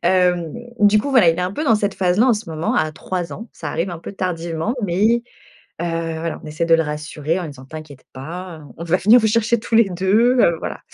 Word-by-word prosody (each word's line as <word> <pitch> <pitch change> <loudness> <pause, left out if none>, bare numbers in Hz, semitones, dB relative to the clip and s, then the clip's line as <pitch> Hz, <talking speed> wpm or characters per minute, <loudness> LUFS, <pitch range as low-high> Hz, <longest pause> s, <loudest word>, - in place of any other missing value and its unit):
Hem, 180 -3 +2 0.3
du 205 +1 +5
coup, 280 +7 -2
voilà, 240 -11 +5
il 165 - +3
est - - 0
un 180 - -2
peu 305 +9 -3
dans 230 - +4
cette 205 -1 0
phase 180 0 +1
là 230 - +5
en 255 - +5
ce 210 -4 -6
moment 160 0 -2
à 155 0 +1
3 180 +2 -4
ans. 230 - -8
Ça 155 - -6
arrive 170 +4 -2
un 170 - -6
peu 165 - -8
tardivement, 170 +1 -3
mais, 210 +6 +2 0.6
heu, - - -1 0.3
voilà, 165 0 -4
on - - -9
essaie 155 +2 -2
de 165 0 +5
le 165 - +1
rassurer 150 +2 -3
en - - -4
lui 165 - -5
disant: 130 -2 -12
«T'inquiète 155 -2 -10
pas, 165 +5 -7
heu, - - -13
on 170 - -6
va 170 +2 +1
venir 215 +7 +6
vous 220 - 0
chercher 230 +1 +2
tous 225 - -9
les 225 -3 +5
2, 210 +8 +2
heu, 170 -7 +4
voilà». - - -5
180 Hz, 260 wpm, -20 LUFS, 160-210 Hz, 0.6 s, venir